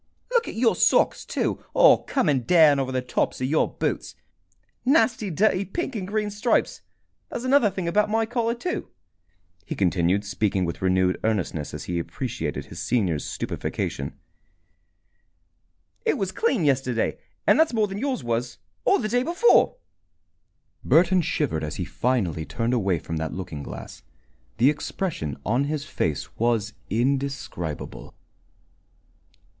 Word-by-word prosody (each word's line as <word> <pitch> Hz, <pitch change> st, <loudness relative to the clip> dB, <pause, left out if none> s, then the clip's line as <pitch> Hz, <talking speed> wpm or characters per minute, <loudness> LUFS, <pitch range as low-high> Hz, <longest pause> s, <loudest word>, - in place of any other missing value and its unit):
Look 475 Hz, -1 st, +2 dB
at -, -, -6 dB
your 230 Hz, 0 st, +3 dB
socks, -, -, +3 dB
too, -, -, -2 dB
all -, -, +7 dB
coming 150 Hz, -, +2 dB
down 150 Hz, +1 st, +5 dB
over 130 Hz, -1 st, -1 dB
the 130 Hz, -1 st, -1 dB
tops 125 Hz, -, -1 dB
of 130 Hz, -, -1 dB
your 155 Hz, +4 st, +1 dB
boots! -, -, -3 dB, 0.7 s
Nasty 245 Hz, -6 st, +3 dB
dirty 190 Hz, +3 st, +2 dB
pink 270 Hz, -, -4 dB
and 190 Hz, -4 st, -3 dB
green 210 Hz, 0 st, -1 dB
stripes! 210 Hz, +4 st, 0 dB, 0.5 s
There's 240 Hz, -, -5 dB
another 255 Hz, -4 st, +4 dB
thing 185 Hz, -2 st, -4 dB
about 210 Hz, +5 st, +2 dB
my 225 Hz, +1 st, +2 dB
collar, 235 Hz, 0 st, -1 dB
too," 360 Hz, +10 st, -4 dB, 0.7 s
he -, -, -5 dB
continued, 95 Hz, +1 st, +1 dB
speaking 100 Hz, -2 st, 0 dB
with 85 Hz, -, -5 dB
renewed 95 Hz, 0 st, +2 dB
earnestness 95 Hz, -8 st, -1 dB
as -, -, -6 dB
he 85 Hz, -1 st, -2 dB
appreciated 110 Hz, -, -4 dB
his -, -, -8 dB
senior's 95 Hz, -11 st, 0 dB
stupefaction. 70 Hz, +8 st, -4 dB, 1.9 s
"It -, -, +1 dB
was 190 Hz, -1 st, -2 dB
clean 255 Hz, -, +1 dB
yesterday, 130 Hz, -4 st, +1 dB, 0.3 s
and -, -, +5 dB
that's 320 Hz, -, +4 dB
more 220 Hz, -3 st, +2 dB
than 195 Hz, 0 st, -5 dB
yours 265 Hz, 0 st, -2 dB
was 120 Hz, +1 st, -2 dB, 0.3 s
or -, -, +4 dB
the 215 Hz, -, -2 dB
day 245 Hz, +3 st, +1 dB
before!" 345 Hz, -, +4 dB, 1.1 s
Burton 175 Hz, +5 st, +4 dB
shivered 150 Hz, -, -1 dB
as 75 Hz, -, -4 dB
he -, -, -3 dB
finally 105 Hz, -11 st, -1 dB
turned 115 Hz, +8 st, -2 dB
away 100 Hz, -7 st, +1 dB
from 80 Hz, +1 st, -5 dB
that 80 Hz, 0 st, -3 dB
looking 85 Hz, -6 st, -6 dB
glass. -, -, -9 dB, 0.6 s
The 130 Hz, +6 st, +5 dB
expression 150 Hz, -, -3 dB
upon 120 Hz, -, 0 dB
his 150 Hz, 0 st, -3 dB
face 80 Hz, -, -3 dB
was 115 Hz, -3 st, +1 dB, 0.2 s
indescribable. 130 Hz, -, -2 dB
135 Hz, 145 wpm, -25 LUFS, -, 1.9 s, all